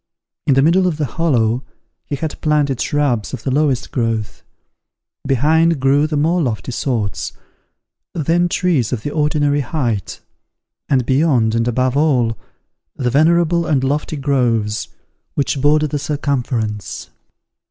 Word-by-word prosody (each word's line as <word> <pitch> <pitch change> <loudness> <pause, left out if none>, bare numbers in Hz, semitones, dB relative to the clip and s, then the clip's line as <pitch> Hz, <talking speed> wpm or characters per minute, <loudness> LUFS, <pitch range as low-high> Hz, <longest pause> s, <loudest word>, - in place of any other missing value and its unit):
In 140 - +4
the 135 - +4
middle 180 +4 +4
of 165 -4 -1
the 150 - 0
hollow 125 -4 0 0.4
he 145 - -2
had 155 +2 -5
planted 145 -4 +1
shrubs 140 -7 0
of 120 - -12
the 135 - -1
lowest 140 -2 0
growth; 115 -3 -2 0.9
behind 155 +4 +3
grew 140 +3 +3
the 155 -1 -2
more 165 +4 +2
lofty 125 -2 -2
sorts; 115 -5 -2 0.8
then 170 +3 +1
trees 165 - +1
of 115 -4 -3
the 145 - -3
ordinary 150 -1 +1
height; 120 - -2 0.7
and 130 -3 +2
beyond 130 -5 +2
and 115 +1 +1
above 125 +2 0
all, 130 -7 +2 0.6
the 125 -2 -1
venerable 170 +3 +3
and 140 -4 +1
lofty 150 +3 -1
groves 120 -7 0 0.5
which 140 -1 -1
border 150 +2 +3
the 145 0 -2
circumference. 125 -8 -3
140 Hz, 135 wpm, -18 LUFS, 120-155 Hz, 0.9 s, In